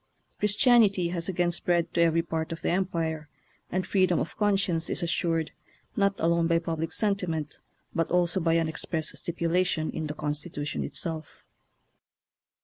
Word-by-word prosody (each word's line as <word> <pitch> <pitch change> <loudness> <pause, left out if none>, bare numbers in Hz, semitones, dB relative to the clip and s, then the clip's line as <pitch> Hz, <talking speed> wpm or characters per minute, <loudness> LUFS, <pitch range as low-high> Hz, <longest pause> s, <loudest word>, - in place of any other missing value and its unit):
Chris 210 0 +2
tianity 205 -9 +4
has 175 0 -2
again 175 -1 +1
spread 170 0 0
to 170 - +2
every 165 0 +3
part 160 -1 -3
of 165 - -6
the - - +1
Empire, 165 -4 -1 0.4
and 185 0 -1
freedom 185 -3 +2
of - - -4
conscience 195 -5 +1
is 170 - -1
assured 165 -2 0 0.4
not 200 -1 +2
alone 170 0 +2
by 170 0 +3
public 165 -1 -3
sentiment, 180 -8 -1 0.3
but 165 -1 0
also 180 +1 +2
by 165 -1 +2
an 165 -1 +2
express 160 0 -2
stipulation 170 -1 0
in 160 -1 -4
the 150 - -5
Constitution 150 0 -3
itself. 160 -3 -3
170 Hz, 150 wpm, -27 LUFS, 160-180 Hz, 0.4 s, tianity